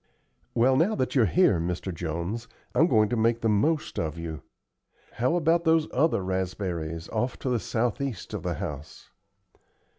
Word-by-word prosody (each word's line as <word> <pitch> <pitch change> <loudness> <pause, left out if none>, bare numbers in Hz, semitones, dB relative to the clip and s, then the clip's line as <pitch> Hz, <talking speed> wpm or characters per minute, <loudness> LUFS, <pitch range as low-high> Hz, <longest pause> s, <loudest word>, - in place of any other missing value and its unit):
"Well, 125 +3 +4
now 190 +9 +3
that 130 - -1
you're 120 -6 +4
here, 170 - +4
Mr. 90 +2 -3
Jones, 85 +7 -4 0.3
I'm 165 - +4
going 110 -8 +4
to 120 - 0
make 115 +1 +2
the 115 - +2
most 150 +10 +1
of 80 0 -2
you. 80 -2 -5 0.7
How 125 +8 0
about 170 0 +2
those 160 -1 +3
other 140 - +2
raspberries 90 -3 -3
off 120 +3 -1
to 130 - -3
the 120 -2 +1
southeast 115 -3 -2
of - - -3
the - - -2
house?" 75 +1 -7
110 Hz, 160 wpm, -27 LUFS, 90-135 Hz, 0.7 s, Well